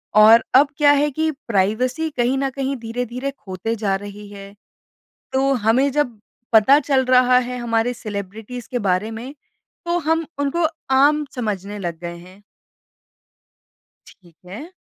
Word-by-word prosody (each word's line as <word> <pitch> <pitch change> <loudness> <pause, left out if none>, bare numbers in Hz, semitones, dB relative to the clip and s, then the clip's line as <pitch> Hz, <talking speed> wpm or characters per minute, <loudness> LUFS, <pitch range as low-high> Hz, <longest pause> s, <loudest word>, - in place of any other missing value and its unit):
और 220 +2 +7
अब 280 +3 +7
क्या 290 -2 +5
है 290 +1 +2
कि 315 +3 -1 0.2
प्राइवेसी 240 +9 0
कहीं 245 +2 +1
न 270 0 0
कहीं 270 +1 -3
धीरे-धीरे 245 +3 -4
खोते 195 +4 -4
जा 205 -3 -1
रही 205 +1 -8
है। 200 -1 -11 0.8
तो 270 +1 +2
हमें 245 +3 +2
जब 255 -6 -1 0.3
पता 225 +6 +6
चल 270 -2 +1
रहा 250 0 +5
है 250 0 -2
हमारे 235 0 0
सेलिब्रिटीज़ 215 +2 -7
के 245 - -1
बारे 185 +5 0
में 240 +5 -7 0.5
तो 345 0 0
हम 325 +1 0
उनको 285 +4 0 0.3
आम 295 +3 +4
समझने 210 -4 -4
लग 170 -3 -5
गए 170 0 -6
हैं। 185 +3 -16 1.7
ठीक 170 -4 -20
है। 230 - -9
240 Hz, 145 wpm, -20 LUFS, 205-275 Hz, 1.7 s, और